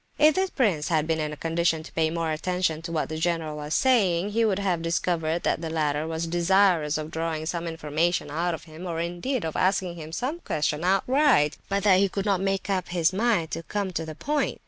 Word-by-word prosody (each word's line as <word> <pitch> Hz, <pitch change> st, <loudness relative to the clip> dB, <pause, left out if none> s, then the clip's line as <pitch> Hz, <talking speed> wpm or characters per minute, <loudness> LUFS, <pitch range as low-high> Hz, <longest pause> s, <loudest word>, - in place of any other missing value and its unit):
If 305 Hz, +1 st, +6 dB
the 380 Hz, +3 st, 0 dB
prince 190 Hz, -, +1 dB
had 155 Hz, -3 st, +1 dB
been 160 Hz, 0 st, 0 dB
in 150 Hz, -1 st, -2 dB
a 150 Hz, -, -7 dB
condition 165 Hz, 0 st, 0 dB
to -, -, -12 dB
pay 160 Hz, -1 st, +1 dB
more 165 Hz, 0 st, -2 dB
attention 165 Hz, 0 st, -1 dB
to 165 Hz, +1 st, -6 dB
what 160 Hz, -2 st, -1 dB
the 155 Hz, -, -4 dB
general 165 Hz, -2 st, -1 dB
was 150 Hz, +1 st, -3 dB
saying, 205 Hz, -7 st, +3 dB
he 230 Hz, +2 st, +2 dB
would 210 Hz, -4 st, +2 dB
have 185 Hz, -4 st, 0 dB
discovered 165 Hz, -1 st, -1 dB
that -, -, 0 dB
the 165 Hz, -, -3 dB
latter 155 Hz, -1 st, 0 dB
was 165 Hz, +1 st, -2 dB
desirous 175 Hz, -2 st, +3 dB
of 155 Hz, 0 st, -5 dB
drawing 160 Hz, -1 st, -2 dB
some 170 Hz, +1 st, -3 dB
information 165 Hz, +1 st, -1 dB
out 170 Hz, +3 st, 0 dB
of -, -, -12 dB
him, 160 Hz, +3 st, -9 dB
or 165 Hz, -1 st, -3 dB
indeed 175 Hz, +7 st, -2 dB
of 160 Hz, -, -4 dB
asking 185 Hz, -2 st, +1 dB
him 155 Hz, -1 st, -8 dB
some 260 Hz, -, -3 dB
question 150 Hz, -, -1 dB
outright; 195 Hz, -, +3 dB
but 200 Hz, 0 st, 0 dB
that 190 Hz, -3 st, +5 dB
he 200 Hz, 0 st, +3 dB
could 195 Hz, +2 st, -3 dB
not 195 Hz, -3 st, +1 dB
make 195 Hz, 0 st, -1 dB
up 190 Hz, -3 st, -1 dB
his 175 Hz, 0 st, +1 dB
mind 205 Hz, -6 st, +1 dB
to 165 Hz, -, -3 dB
come 195 Hz, +2 st, -3 dB
to 165 Hz, -, -2 dB
the 160 Hz, -1 st, -7 dB
point. 295 Hz, -, -1 dB
170 Hz, 230 wpm, -26 LUFS, 160-195 Hz, -, If